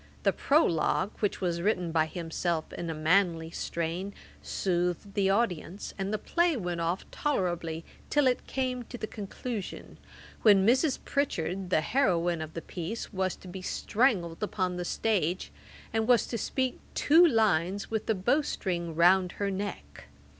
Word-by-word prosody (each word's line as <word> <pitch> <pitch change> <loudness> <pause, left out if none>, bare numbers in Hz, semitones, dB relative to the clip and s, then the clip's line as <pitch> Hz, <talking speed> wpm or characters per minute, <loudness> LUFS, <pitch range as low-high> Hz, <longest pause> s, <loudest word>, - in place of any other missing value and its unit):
The - - +3
Prologue, 205 - +2
which 205 - -1
was 170 -2 0
written 180 -3 0
by 160 -1 +2
himself 165 -1 -3
in 170 - -4
a - - -1
manly 165 0 +2
strain, 170 +5 -3 0.3
soothed 180 +1 -1
the 195 -2 +2
audience, 195 -3 -1
and 195 0 -3
the 215 - 0
play 345 +6 +1
went 175 -5 -3
off 170 +3 -1
tolerably, 175 - -1 0.2
till 290 -1 +3
it 255 -1 +1
came 255 -2 -1
to 245 - -8
the 220 - -3
conclusion, 215 +1 -6 0.4
when 200 -3 +6
Mrs. 260 +5 +3
Pritchard, 190 - -1
the 155 - +3
heroine 175 - +1
of 155 0 -7
the 165 - -5
piece, 185 +7 -5
was 190 -1 0
to - - -14
be 185 +1 -7
strangled 185 -5 0
upon 185 -3 -1
the 180 0 -3
stage, 185 -4 0 0.4
and 225 0 +1
was 245 -2 +5
to 235 - -2
speak 260 +2 -1 0.2
two 325 +4 +6
lines 200 - +2
with 220 -1 -2
the 220 - +2
bow 240 +11 +2
string 175 - -3
round 180 +2 +4
her 200 -1 -2
neck. 190 - -6
190 Hz, 160 wpm, -29 LUFS, 170-225 Hz, 0.4 s, when